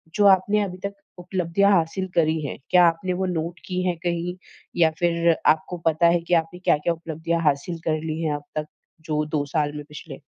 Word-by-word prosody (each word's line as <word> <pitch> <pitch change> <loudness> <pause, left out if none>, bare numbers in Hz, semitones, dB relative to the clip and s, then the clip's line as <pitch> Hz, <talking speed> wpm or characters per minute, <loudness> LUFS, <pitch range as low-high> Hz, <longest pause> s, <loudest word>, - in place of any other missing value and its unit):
जो 205 - +3
आपने 200 +2 +4
अभी 185 -2 -5
तक 200 - -3 0.3
उपलब्धियाँ 180 +2 +1
हासिल 185 +1 +1
करी 160 -1 +2
हैं, - - -5
क्या 180 -1 +6
आपने 170 +2 0
वो 190 +1 -1
नोट 170 -1 -3
की 185 -1 -2
हैं 175 - +1
कहीं 175 0 -2 0.4
या 165 -2 +5
फिर 170 -1 +3
आपको 175 +3 +2
पता 165 +1 +4
है 170 0 +3
कि 175 +1 -3
आपने 165 +2 +1
क्या-क्या 170 -1 +2
उपलब्धियाँ 165 +1 -3
हासिल 150 +4 0
कर 155 -1 +1
ली 160 0 -3
हैं 155 -3 0
अब 145 - -7
तक, 155 - -1 0.4
जो 155 -2 -1
2 150 -1 -1
साल 145 0 0
में 150 - -6
पिछले? 150 -1 -10
170 Hz, 205 wpm, -24 LUFS, 155-180 Hz, 0.4 s, क्या